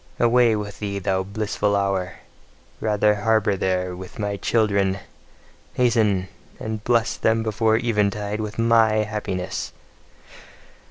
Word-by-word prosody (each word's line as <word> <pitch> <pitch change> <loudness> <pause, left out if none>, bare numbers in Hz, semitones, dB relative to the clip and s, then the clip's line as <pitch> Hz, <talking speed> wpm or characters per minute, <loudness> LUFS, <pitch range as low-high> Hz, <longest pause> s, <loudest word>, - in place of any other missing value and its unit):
Away 120 -1 +4
with 105 -1 -5
thee, 100 -1 -3
thou 95 0 0
blissful 100 +1 -1
hour! 100 -2 0 0.7
Rather 105 -1 +2
harbour 105 0 +1
there 90 -1 -1
with 95 +1 -10
my 105 -1 -2
children! 100 -2 +1 0.8
Hasten! 110 -6 +2 0.3
and 110 -1 -5
bless 115 -1 +1
them 110 0 +1
before 110 0 +2
eventide 105 -2 0
with 105 0 -5
MY 115 -1 +4
happiness! 105 -4 -4
105 Hz, 115 wpm, -23 LUFS, 100-110 Hz, 0.8 s, Away